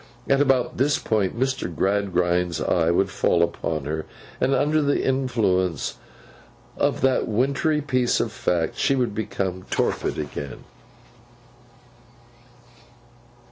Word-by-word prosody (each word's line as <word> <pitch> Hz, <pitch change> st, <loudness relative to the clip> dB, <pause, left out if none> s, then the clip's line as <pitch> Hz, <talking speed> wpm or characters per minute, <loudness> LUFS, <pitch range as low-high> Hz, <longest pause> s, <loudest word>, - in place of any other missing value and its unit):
At 135 Hz, +1 st, +3 dB
about 135 Hz, -3 st, +2 dB
this 145 Hz, +3 st, +2 dB
point, 110 Hz, 0 st, -1 dB
Mr. 130 Hz, 0 st, 0 dB
Gradgrind's 90 Hz, -2 st, 0 dB
eye 85 Hz, -1 st, +1 dB
would 95 Hz, +3 st, +2 dB
fall 85 Hz, -2 st, +2 dB
upon 80 Hz, -3 st, -2 dB
her; 80 Hz, +2 st, -3 dB, 0.3 s
and 135 Hz, +1 st, +2 dB
under 150 Hz, +3 st, +2 dB
the 145 Hz, -1 st, +1 dB
influence 105 Hz, -, 0 dB, 0.8 s
of -, -, 0 dB
that 135 Hz, -1 st, +2 dB
wintry 140 Hz, +7 st, +1 dB
piece 130 Hz, -4 st, +1 dB
of -, -, -1 dB
fact, 85 Hz, -2 st, -1 dB
she 135 Hz, -, +2 dB
would 125 Hz, -5 st, 0 dB
become 95 Hz, -3 st, -3 dB
torpid -, -, -1 dB
again. 70 Hz, -1 st, -6 dB
105 Hz, 115 wpm, -24 LUFS, 90-135 Hz, 0.8 s, At